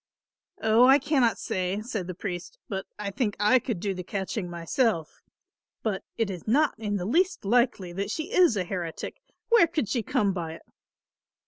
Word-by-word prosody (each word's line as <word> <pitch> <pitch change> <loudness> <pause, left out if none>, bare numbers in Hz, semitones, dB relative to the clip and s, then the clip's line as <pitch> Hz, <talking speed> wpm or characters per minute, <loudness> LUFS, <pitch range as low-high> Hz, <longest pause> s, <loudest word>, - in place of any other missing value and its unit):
"Oh, 225 +3 +6
I 270 +1 +8
cannot 265 -7 +2
say," 185 +2 -2
said 215 -6 -4
the 185 - -5
priest, 180 - -6
"but 195 -5 -4
I 205 -1 -4
think 205 0 -1
I 210 +5 +5
could 235 -5 -3
do 195 +2 -1
the 180 - -5
catching 190 0 -3
myself; 170 - -1 0.6
but 210 -4 -1
it 225 -4 0
is 180 +1 -8
not 290 +7 +3
in 210 -2 -2
the 180 -3 -2
least 350 - +1
likely 225 -5 +2
that 200 +3 -3
she 320 - -4
is 350 - +5
a 185 - +1
heretic. 175 -3 -5 0.3
Where 460 -8 +6
could 310 -8 -1
she 240 +3 0
come 200 -1 +1
by 165 -3 -4
it?" 165 - -12
210 Hz, 185 wpm, -27 LUFS, 185-250 Hz, 0.6 s, I